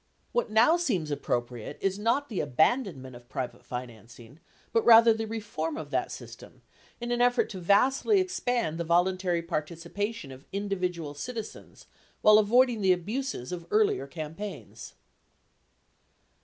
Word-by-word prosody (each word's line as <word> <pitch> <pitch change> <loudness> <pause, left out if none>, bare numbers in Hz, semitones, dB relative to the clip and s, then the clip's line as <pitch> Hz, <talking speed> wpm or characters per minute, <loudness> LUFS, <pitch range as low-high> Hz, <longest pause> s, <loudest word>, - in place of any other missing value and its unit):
What 485 - 0
now 230 +10 +5
seems 195 - -1
appropriate 120 -4 -3
is 195 +1 -1
not 235 +7 +1
the 210 - -4
abandonment 145 - 0
of 120 0 -15
private 130 -2 -5
financing, 120 +2 -9 0.3
but 230 - +3
rather 230 0 +8
the 220 0 -4
reform 225 +8 -4
of - - -7
that - - -1
system - - -11 0.4
in 240 0 -4
an 240 0 +1
effort 245 0 +3
to 190 - -6
vastly 260 - +3
expand 245 - -1
the - - 0
voluntary 175 +1 +1
participation 170 +2 -4
of 130 +2 -13
individual 180 -6 -3
citizens 225 +8 -8 0.4
while 215 0 +8
avoid 245 +5 +4
ing 225 -3 -4
the 190 -1 +5
abuses 205 - -4
of 170 -2 -6
earlier 210 -10 +2
campaigns. 160 +7 -8
195 Hz, 140 wpm, -28 LUFS, 155-230 Hz, 0.4 s, rather